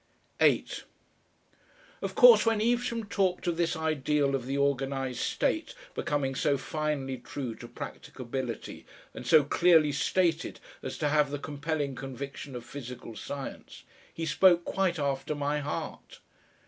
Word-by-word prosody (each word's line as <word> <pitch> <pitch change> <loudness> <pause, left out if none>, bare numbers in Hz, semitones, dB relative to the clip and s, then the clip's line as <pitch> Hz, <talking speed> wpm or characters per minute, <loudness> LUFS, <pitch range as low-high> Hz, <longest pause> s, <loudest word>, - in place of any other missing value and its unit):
8 - - +2 1.2
Of - - -4
course, - - +9
when 225 -2 +2
Evesham 235 +1 +1
talked 190 -2 0
of 175 -1 +1
this 170 0 0
ideal 150 -3 +1
of 130 -2 -2
the 135 +1 -1
organised 135 -2 0
state - - -1 0.2
becoming 140 -2 -1
so 140 +1 +1
finely 140 -2 -2
true 125 0 -5
to - - -9
practicability 125 -2 -6 0.3
and 125 - -8
so 150 +4 +7
clearly 160 0 +4
stated 165 +1 0 0.2
as - - -5
to 150 - 0
have 150 -1 +3
the 145 - -3
compelling 145 0 -3
conviction 135 +1 -7
of 120 -1 -7
physical 125 -4 -8
science, 140 +4 -7 0.3
he 165 - -4
spoke 175 +2 +4
quite 185 -2 0
after 140 0 -1
my 145 +1 0
heart. 145 0 -5
145 Hz, 135 wpm, -29 LUFS, 135-165 Hz, 1.2 s, course